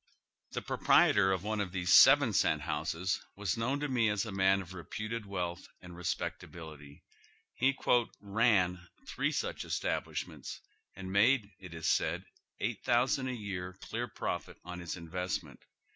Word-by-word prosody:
Tiie - - -5
proprietor 95 -2 +4
of 95 -1 -1
one 110 0 -1
of 95 -3 -3
these 90 0 +1
seven 135 -4 +8
cent 75 -5 +2
houses 90 +6 -2
was 100 -3 -1
known 125 +5 -1
to 150 - 0
nie 120 -5 +2
as 105 +1 0
a 110 - -5
man 95 0 +3
of 95 -1 -8
reputed 110 +5 -5
wealth 90 -2 -4
and 90 -1 -11
respecta 85 -1 -3
bility. 75 -4 -11 0.5
He 135 +2 +1 0.4
"ran" 100 -4 +2 0.2
three - - -1
such - - -2
establishments - - -3 0.4
and 95 -1 -7
made, 105 +1 +3
it 90 -3 -10
was 80 - -3
said, - - +1 0.3
$8,000 120 +4 +1
a 125 - -3
year 95 -4 -5
clear - - -4
profit - - -4
on 90 0 -6
his 85 -1 -5
investment. 90 +2 -4
95 Hz, 150 wpm, -32 LUFS, 90-110 Hz, 0.5 s, seven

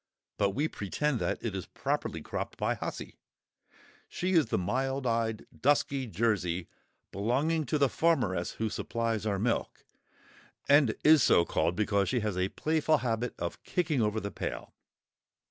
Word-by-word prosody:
But 100 -1 +1
we 145 +4 +1
pretend 135 +4 -2
that - - -1
it 110 -4 -2
is 95 - -5
properly - - -3
cropped - - -5
by - - +1
"Hussy;" - - -6 0.9
she 185 +1 -2
is 165 -8 +4
the - - 0
mild 130 +8 -1
eyed 115 -2 0
dusky 140 -1 +1
Jersey, 90 -5 0 0.4
belonging 140 - 0
to 150 - +1
the 140 -1 +4
farmeress 105 - +1
who 110 - -2
supplies 115 -2 -2
our 100 -2 0
milk, 115 +4 -2 0.8
and 140 -5 +5
is 155 -1 +7
so 85 - +5
called, 85 - 0
because 100 -1 +1
she 125 -3 0
has 105 -3 -1
a 90 +1 0
playful 155 +3 +1
habit 120 -2 -2
of 85 0 -4
kicking 155 -7 0
over 105 0 +1
the 100 -1 -5
pail. - - -5
115 Hz, 155 wpm, -30 LUFS, 100-140 Hz, 0.9 s, is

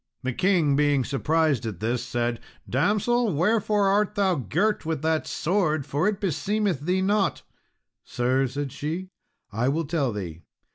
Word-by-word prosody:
The 130 0 -1
king 170 -4 +2
being 145 -2 +3
surprised 150 0 +1
at 100 -6 -6
this, 120 +2 -1
said, 120 -2 -2 0.3
"Damsel, 210 - +1
wherefore 210 +4 +2
art 205 +1 +2
thou 195 -3 +2
girt 175 - 0
with 160 -2 -3
that 160 0 0
sword, 155 -5 0
for 145 +6 0
it 210 -2 0
beseemeth 200 -1 0
thee 180 +6 0
not?" 200 -2 +1 0.6
"Sir," 130 +2 0
said 140 +1 -4
she, 165 +8 -4 0.4
"I 115 +5 0
will 160 +3 0
tell 145 -4 0
thee. 90 -6 -6
155 Hz, 150 wpm, -25 LUFS, 130-195 Hz, 0.6 s, being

